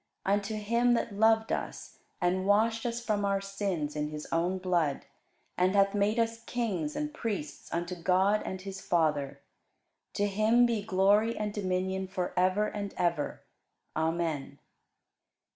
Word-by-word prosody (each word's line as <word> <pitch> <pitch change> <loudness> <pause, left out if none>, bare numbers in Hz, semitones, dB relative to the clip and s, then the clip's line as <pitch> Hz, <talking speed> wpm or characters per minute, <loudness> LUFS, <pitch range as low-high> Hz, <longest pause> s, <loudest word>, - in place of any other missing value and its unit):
Unto 205 +2 0
him 235 +3 +2
that 230 - -2
loved 220 +2 +3
us, - - -4 0.2
and 185 +1 +1
washed 225 +3 +3
us 235 0 -2
from 210 -2 0
our 200 -1 +1
sins 195 -7 -3
in 150 0 -1
his 150 0 -6
own 175 +3 +1
blood, 175 -6 0 0.5
and 185 +2 +3
hath 195 0 +4
made 205 +2 +1
us 230 0 0
kings 195 -11 -2
and 300 0 -3
priests 210 - -5
unto 175 +1 -2
God 185 +4 +2
and 190 0 -5
his 195 0 -7
Father; 150 -5 0 0.7
to 205 - +1
him 215 +4 +4
be 230 -3 0
glory 205 +3 +3
and 210 -1 -2
dominion 190 -1 -1
for 185 -1 -3
ever 185 +3 +3
and 205 -1 -5
ever. 170 -4 -1 0.5
Amen. 160 -2 -1
195 Hz, 145 wpm, -30 LUFS, 180-215 Hz, 0.7 s, hath